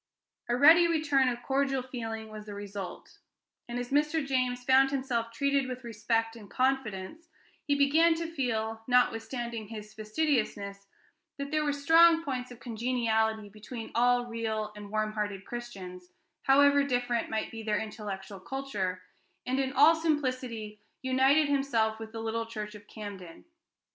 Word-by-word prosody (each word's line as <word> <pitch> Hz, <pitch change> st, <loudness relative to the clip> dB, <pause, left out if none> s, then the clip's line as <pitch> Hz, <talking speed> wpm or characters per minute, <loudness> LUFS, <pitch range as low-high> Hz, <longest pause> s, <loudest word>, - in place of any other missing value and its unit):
A 240 Hz, -, +2 dB
ready 330 Hz, +6 st, +8 dB
return 295 Hz, -5 st, +2 dB
of 240 Hz, 0 st, -5 dB
cordial 270 Hz, -1 st, 0 dB
feeling 225 Hz, -3 st, -6 dB
was 215 Hz, 0 st, -9 dB
the 205 Hz, -, -7 dB
result; 200 Hz, -2 st, -8 dB, 0.5 s
and 240 Hz, -, -3 dB
as 245 Hz, +1 st, -4 dB
Mr. 300 Hz, +1 st, +2 dB
James 255 Hz, -2 st, 0 dB
found 265 Hz, +1 st, +5 dB
himself 255 Hz, -4 st, -2 dB
treated 280 Hz, +2 st, +1 dB
with 255 Hz, 0 st, -6 dB
respect 225 Hz, 0 st, -1 dB
and 210 Hz, -4 st, -12 dB
confidence, 265 Hz, -, -1 dB, 0.4 s
he 285 Hz, -, +3 dB
began 315 Hz, +4 st, +4 dB
to 330 Hz, 0 st, -3 dB
feel, 225 Hz, -8 st, -2 dB
notwithstanding 235 Hz, -2 st, 0 dB
his 215 Hz, -1 st, -9 dB
fastidiousness, 215 Hz, -4 st, -1 dB, 0.5 s
that 280 Hz, +1 st, -5 dB
there 305 Hz, 0 st, +1 dB
were 295 Hz, -, +1 dB
strong 325 Hz, +3 st, +5 dB
points 255 Hz, -4 st, -3 dB
of 245 Hz, -2 st, -12 dB
congeniality 225 Hz, -2 st, 0 dB
between 215 Hz, +3 st, -8 dB
all 245 Hz, +1 st, +3 dB
real 220 Hz, -2 st, -3 dB
and 205 Hz, -1 st, -9 dB
warm 215 Hz, 0 st, -1 dB
hearted 205 Hz, -2 st, -3 dB
Christians, 190 Hz, -7 st, -8 dB, 0.3 s
however 285 Hz, +1 st, +5 dB
different 245 Hz, -3 st, -1 dB
might 220 Hz, 0 st, -2 dB
be 225 Hz, -, -7 dB
their 215 Hz, -1 st, 0 dB
intellectual 205 Hz, -3 st, -6 dB
culture, 190 Hz, -6 st, -4 dB, 0.4 s
and 260 Hz, +2 st, 0 dB
in 265 Hz, -1 st, 0 dB
all 290 Hz, +4 st, +7 dB
simplicity 255 Hz, -9 st, -2 dB, 0.2 s
united 265 Hz, +4 st, +4 dB
himself 240 Hz, -6 st, +1 dB
with 220 Hz, -1 st, -8 dB
the 225 Hz, 0 st, -6 dB
little 225 Hz, 0 st, -2 dB
church 215 Hz, -2 st, -6 dB
of 205 Hz, -1 st, -13 dB
Camden. 195 Hz, -6 st, -9 dB
240 Hz, 150 wpm, -29 LUFS, 215-275 Hz, 0.5 s, ready